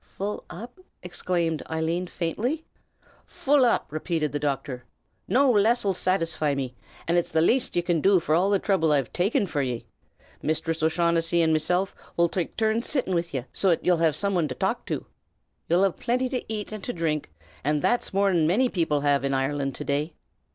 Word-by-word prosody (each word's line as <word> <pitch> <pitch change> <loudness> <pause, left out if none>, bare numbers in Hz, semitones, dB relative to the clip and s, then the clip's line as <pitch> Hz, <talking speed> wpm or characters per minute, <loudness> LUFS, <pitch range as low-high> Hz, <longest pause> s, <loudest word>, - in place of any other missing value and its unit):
"Full 205 +2 -5
up?" 240 - -9 0.2
exclaimed 170 -3 -1
Eileen, 165 +3 -1
faintly. 225 - -2 0.6
"Full 285 -1 +2
up!" 235 - +2
repeated 155 0 -1
the 145 - -2
doctor. 135 -3 -3 0.4
"No 270 +1 +4
less'll 215 -1 +3
satisfy 165 -5 +1
me, 130 -2 -3 0.3
and 170 +1 +3
it's 175 - -3
the 160 - +2
laste 240 +11 +2
ye 175 - +2
can 170 -3 +1
do 195 +1 +5
for 155 - -1
all 180 +5 +3
the 200 - +4
throuble 175 -6 +1
I've 140 -4 +1
taken 200 +3 +1
forr 150 -6 -2
ye. 125 -3 -3 0.6
Misthress 160 +1 -1
O'Shaughnessy 165 +1 +2
an' 160 -1 +3
mesilf 180 +5 +1 0.2
'ull 170 0 +4
take 175 0 -3
turns 220 +1 +1
sittin' 255 -10 0
wid 170 -1 -1
ye, 130 -3 -3
so 195 - +1
'at 170 - +1
ye'll 180 -1 +4
have 160 -2 +2
some 200 -1 0
wan 170 -4 +1
to 130 - -5
talk - - -2
to. - - -3 0.6
Ye'll 175 +3 +4
have 195 -3 +1
plinty 250 +2 0
to 250 -4 -4
ate 215 0 -4
an' 215 - -6
to 245 - -4
dhrink, 155 -3 -2 0.3
an' 150 +1 +1
that's 240 - +1
more 195 0 +2
than 165 -3 +3
manny 240 +9 +3
people 160 -7 0
have 145 -1 +2
in 135 0 0
Ireland 135 0 -1
this - - -6
day. 150 +3 -1
170 Hz, 195 wpm, -26 LUFS, 155-200 Hz, 0.6 s, do